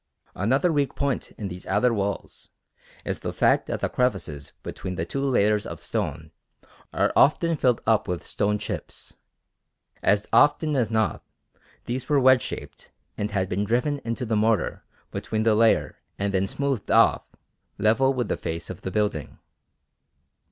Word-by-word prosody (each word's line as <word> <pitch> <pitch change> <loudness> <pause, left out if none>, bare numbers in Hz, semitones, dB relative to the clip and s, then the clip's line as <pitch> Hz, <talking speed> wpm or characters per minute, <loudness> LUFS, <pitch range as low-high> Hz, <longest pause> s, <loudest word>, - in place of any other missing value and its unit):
Another 135 - +1
weak 145 -2 0
point 140 -2 -1
in 105 - -4
these 90 0 -8
outer 105 +5 +2
walls 100 -1 -3 0.6
is - - -2
the - - -4
fact - - +2
that - - -3
the - - +1
crevices 75 - -2
between 90 - -5
the 80 - -2
two 135 +10 -3
layers 105 -6 +2
of - - -8
stone 80 +1 -3 0.6
are - - +1
often 165 +3 +4
filled 125 -5 +2
up 110 -3 +2
with 90 -2 -3
stone 105 0 0
chips. - - -7 0.8
As 105 +1 +2
often 150 +1 +4
as 120 -5 +1
not 110 -1 0 0.6
these 125 +3 -4
were 145 -2 +4
wedge 130 -1 +6
shaped - - -8 0.3
and 105 - -2
had 95 -3 -1
been 95 +3 -1
driven 125 +7 0
into 115 +2 -3
the 110 -1 0
mortar 110 0 +1 0.3
between 110 0 -2
the 110 -1 +4
layer 110 +1 +2 0.2
and 100 0 -1
then 95 0 +1
smoothed 140 -1 -2
off - - +4 0.5
level 115 +6 +3
with 125 -3 -1
the - - -1
face 85 +2 -5
of 90 - -9
the - - -4
building. 100 - -2
110 Hz, 160 wpm, -25 LUFS, 100-130 Hz, 0.8 s, wedge